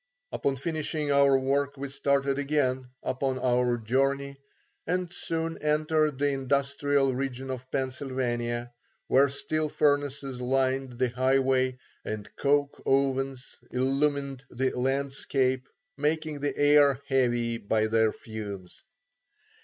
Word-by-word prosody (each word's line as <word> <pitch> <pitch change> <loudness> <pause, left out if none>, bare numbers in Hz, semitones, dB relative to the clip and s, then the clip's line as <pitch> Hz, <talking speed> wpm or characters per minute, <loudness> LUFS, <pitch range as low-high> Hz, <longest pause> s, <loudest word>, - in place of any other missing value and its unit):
Upon 140 - 0
finishing 155 +1 -2
our 140 -1 +5
work 140 +1 0
we 140 +1 -4
started 140 0 +1
again 135 -3 0 0.2
upon 130 0 -1
our 125 -1 +2
journey 135 +4 0 0.5
and 180 0 -1
soon 165 -1 -3
entered 150 -1 +1
the 145 +1 +2
industrial 140 0 +1
region 130 0 -3
of 130 0 -7
Pennsylvania, 120 -3 -2 0.3
where 140 +2 +4
steel 155 +3 -1
furnaces 145 -3 0
lined 130 0 0
the 125 +1 0
highway 130 0 +2 0.3
and 105 -1 -5
coke 145 0 +1
ovens 135 -1 0
illumined 135 +1 0
the 130 +2 0
landscape, 135 0 0 0.3
making 155 0 -1
the 145 +1 -2
air 145 -2 +5
heavy 120 -3 +1
by 110 +1 +1
their 110 0 +3
fumes. 100 -6 -8
135 Hz, 115 wpm, -28 LUFS, 130-140 Hz, 0.5 s, our